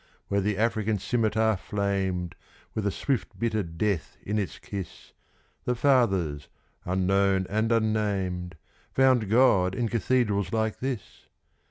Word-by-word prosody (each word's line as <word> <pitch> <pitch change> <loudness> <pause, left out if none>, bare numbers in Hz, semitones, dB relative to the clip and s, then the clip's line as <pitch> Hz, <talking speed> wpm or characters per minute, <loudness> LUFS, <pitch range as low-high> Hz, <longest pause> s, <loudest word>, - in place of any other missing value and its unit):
Where 100 0 +2
the 105 0 0
African 110 -1 +1
scimitar 110 0 +1
flamed, 95 -3 -2 0.4
with 105 -2 -1
a - - +1
swift, 135 +5 -2
bitter 110 -2 0
death 85 +1 -2
in 105 +1 -1
its 100 - -3
kiss, 95 -4 -8 0.5
The 125 - +1
fathers, 95 - +2 0.4
unknown 95 +1 +2
and 110 +2 +1
unnamed, 100 -6 0 0.4
found 130 -6 +4
God 105 -6 +4
in 120 +2 0
cathedrals 105 -5 +1
like 110 -1 -1
this! 130 -5 -5
105 Hz, 125 wpm, -27 LUFS, 95-115 Hz, 0.5 s, found